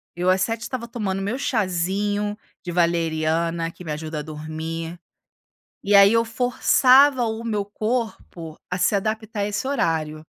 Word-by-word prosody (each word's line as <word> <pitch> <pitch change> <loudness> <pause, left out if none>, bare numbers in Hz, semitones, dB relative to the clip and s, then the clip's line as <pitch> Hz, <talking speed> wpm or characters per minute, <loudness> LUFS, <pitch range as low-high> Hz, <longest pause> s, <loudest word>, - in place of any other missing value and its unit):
eu 180 +1 0
às 185 0 +3
19:00 225 +4 -1
estava 235 0 -5
tomando 195 -5 -3
meu 225 +7 -2
chazinho 205 -1 -1 0.3
de 175 - -5
valeriana, 165 -1 0
que 180 - -13
me 160 - -5
ajuda 155 +1 -4
a - - -3
dormir. 160 +2 -6 0.8
E 205 +1 +2
aí 200 0 +8
eu 230 0 +3
forçava 255 +3 +4
o 225 0 -3
meu 210 -3 -1
corpo 210 -6 -4
a 180 - -2
se 185 +3 +2
adaptar 215 +1 -2
a - - +1
esse 210 +4 -3
horário. 160 - -1
195 Hz, 155 wpm, -23 LUFS, 165-225 Hz, 0.8 s, aí